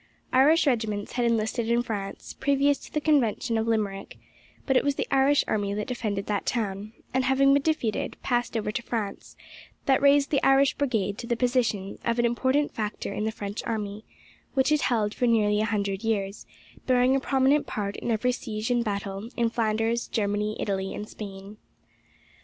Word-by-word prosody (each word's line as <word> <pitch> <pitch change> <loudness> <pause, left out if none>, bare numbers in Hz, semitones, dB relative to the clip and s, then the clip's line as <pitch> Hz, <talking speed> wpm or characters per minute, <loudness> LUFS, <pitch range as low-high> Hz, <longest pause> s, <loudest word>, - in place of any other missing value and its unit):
Irish 300 +6 +5
regiments 220 -6 0
had 245 -1 0
enlisted 230 0 0
in 235 +1 +2
France, 205 -4 -5
previous 280 0 +2
to - - -13
the 300 - 0
Convention 255 -6 +1
of 225 0 0
Limerick; 205 -3 -2 0.5
but 265 - +1
it - - +4
was 285 -1 +1
the - - -1
Irish 275 +1 +4
army 200 -1 -1
that 210 0 -2
defended 215 -5 -3
that 205 -2 -2
town, 210 -2 -2 0.2
and, 260 0 +2
having 275 +1 +4
been 280 - +4
defeated, 275 -8 -1
passed 240 -2 0
over 210 -1 -2
to 225 - -3
France, 225 -4 -5 0.5
that 270 -1 +3
raised 280 0 +4
the 280 - +2
Irish 270 0 +5
Brigade 220 -8 -1
to 235 - -6
the 235 - +1
position 235 -5 0
of 235 0 0
an 240 - +2
important 260 +5 +1
factor 210 -2 -4
in 210 - -2
the 220 - 0
French 205 -1 -5
army, 210 -2 -3 0.5
which 265 +2 +2
it 305 -1 +3
held 215 -5 +1
for 245 - 0
nearly 210 -2 +3
a - - +1
hundred 200 -1 -2
years, 205 -3 -2 0.4
bearing 255 +1 +4
a - - +2
prominent 270 +2 +2
part 200 -1 -3
in - - -4
every 235 +2 +1
siege 220 -1 -4
and 240 -1 +2
battle 200 0 -4
in 235 -1 +1
Flanders, 225 +1 0
Germany, 210 0 -1
Italy, 195 -1 -2
and 210 - -6
Spain. 200 0 -9
230 Hz, 185 wpm, -26 LUFS, 210-260 Hz, 0.5 s, Irish